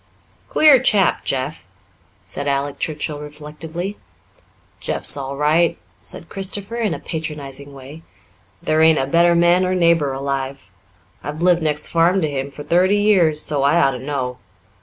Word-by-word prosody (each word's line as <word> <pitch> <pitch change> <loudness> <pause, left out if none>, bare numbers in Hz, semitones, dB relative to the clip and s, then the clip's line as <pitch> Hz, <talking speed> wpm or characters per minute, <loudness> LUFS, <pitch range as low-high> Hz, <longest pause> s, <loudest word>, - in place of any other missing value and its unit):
"Queer 295 -5 +6
chap, 205 -7 +2
Jeff," 135 +4 -3 0.6
said 140 +9 -5
Alec 140 0 -1
Churchill 150 -1 -3
reflectively. 155 +6 -7 0.8
"Jeff's - - -1
all 140 -1 -5
right," 155 +4 +2 0.2
said - - -10
Christopher 200 +3 -4
in 225 -3 -1
a - - -8
patronizing 145 -4 -6
way. 140 +3 -11 0.6
"There 155 0 +1
ain't 160 -1 +5
a 135 - +1
better 170 +4 +3
man 175 +2 +4
or 185 0 0
neighbour 170 -5 +3
alive. 135 -6 -4 0.5
I've 150 +4 -5
lived 175 -1 +4
next 150 -1 -1
farm 170 +3 +3
to - - +2
him 135 0 -3
for 145 +1 -10
thirty 185 +5 +2
years, 180 -7 +3
so 145 -3 0
I 145 +5 +3
ought 135 -4 +3
to 125 - -6
know. 130 -2 -4
155 Hz, 155 wpm, -20 LUFS, 140-175 Hz, 0.8 s, Queer